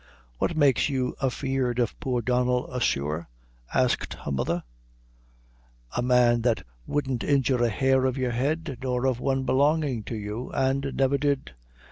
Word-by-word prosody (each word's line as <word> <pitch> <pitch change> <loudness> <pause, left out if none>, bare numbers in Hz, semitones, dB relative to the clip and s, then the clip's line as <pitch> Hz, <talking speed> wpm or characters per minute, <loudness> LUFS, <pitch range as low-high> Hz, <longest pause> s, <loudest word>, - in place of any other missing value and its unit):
"What 170 - 0
makes 145 -1 +4
you 130 -2 -1
afeard 130 -2 -1
of 120 -3 -1
poor 125 -3 -1
Donnel, 125 +1 +1
asthore?" 80 - -1 0.4
asked 130 -1 +1
her - - -6
mother 85 +6 -1 1.3
"a 120 - +1
man 120 -1 +4
that 115 -1 0 0.2
wouldn't 135 -5 -1
injure 135 -3 +2
a 120 - +3
hair 130 +3 +2
of 130 0 0
your 130 -2 0
head, 135 +2 -2
nor 125 -1 -1
of 130 -2 +1
one 135 0 0
belongin' 140 -1 +2
to 115 - -4
you, 105 +3 -5
an' 135 +1 +1
never 135 +1 +2
did." 140 -1 0
130 Hz, 150 wpm, -26 LUFS, 120-135 Hz, 1.3 s, makes